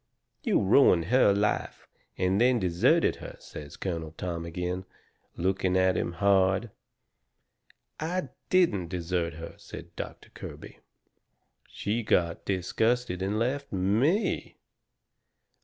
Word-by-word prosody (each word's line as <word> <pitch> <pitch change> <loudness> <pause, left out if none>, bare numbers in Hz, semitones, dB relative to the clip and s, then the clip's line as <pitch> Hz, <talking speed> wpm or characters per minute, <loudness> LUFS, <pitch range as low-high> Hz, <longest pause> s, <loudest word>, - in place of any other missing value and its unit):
"You - - +2
ruined 95 -5 +5
her 130 -5 +6
life, 100 +1 -1 0.3
and 95 +3 +2
then 125 0 +5
deserted 90 -4 +2
her," - - -9
says 75 -1 -10
Colonel 80 -4 -4
Tom 85 0 -4
agin, 90 +2 -3 0.5
looking 95 +1 +1
at 95 0 +3
him 85 - -1
hard. 100 +3 +2 1.3
"I 165 -2 -2 0.2
DIDN'T 110 - +3
desert 85 -2 -2
her," 80 +1 -8
said - - -10
Doctor - - -8
Kirby. - - -10 0.9
"She 110 +4 -2
got 85 -6 +1
disgusted 100 +2 0
and 100 +3 -1
left 135 +5 -1
ME. 110 - +1
95 Hz, 110 wpm, -28 LUFS, 90-115 Hz, 1.3 s, her